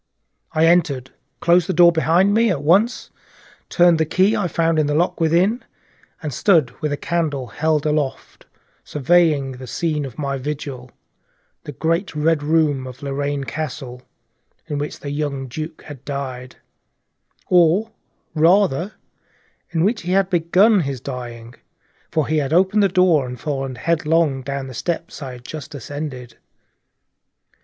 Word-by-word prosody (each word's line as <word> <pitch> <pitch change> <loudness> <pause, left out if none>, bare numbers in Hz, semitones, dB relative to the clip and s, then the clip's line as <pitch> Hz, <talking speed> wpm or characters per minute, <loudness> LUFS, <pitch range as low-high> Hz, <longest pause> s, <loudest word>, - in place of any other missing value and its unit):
I 160 +1 +3
entered, 150 -7 +2 0.3
closed 175 0 +3
the - - +1
door 175 +1 +7
behind 170 +4 +2
me 230 +1 +3
at 150 -7 -1
once, 195 +10 +2 0.6
turned 175 -2 +4
the - - +4
key 190 +6 +2
I 205 -5 0
found 165 -1 +1
in 150 - +2
the 145 - 0
lock 170 +1 0
within, 180 +9 +2 0.6
and 150 -3 -4
stood 160 - +3
with 150 - 0
the 145 - -2
candle 155 -6 -2
held 155 +4 -1
aloft 150 -3 -3 0.4
surveying 150 -2 +2
the 130 0 -9
scene 155 +1 -2
of 130 -5 -8
my 140 -2 -2
vigil, 135 -2 -6 0.8
the - - -6
great 165 +5 -1
Red 155 0 +1
Room 145 -3 +1
of 130 +2 -11
Lorraine 140 0 -2
Castle, 135 -4 -6 0.6
in 145 -3 -4
which 145 +1 -5
the 140 - -5
young 145 -2 -3
Duke 155 +5 -7
had 140 -4 -11
died; 130 -3 -6 0.9
or 180 +5 +3 0.4
rather 170 +2 +3 0.8
in 165 -2 0
which 215 +4 +1
he 180 +2 -2
had 195 0 +2
begun 185 +5 +4
his 140 -6 -3
dying, 120 -2 -7 0.6
for 155 -2 0
he 155 - 0
had 140 -1 -2
opened 190 +5 +3
the 200 - +3
door 175 -7 +3
and 125 -1 -7
fallen 135 -2 -3
headlong 160 -2 +1
down 140 +1 -4
the 130 - -9
steps 170 +5 -4
I 130 -3 -6
had 125 0 -13
just 150 0 -8
ascended. 130 -3 -7
155 Hz, 150 wpm, -20 LUFS, 135-170 Hz, 0.9 s, door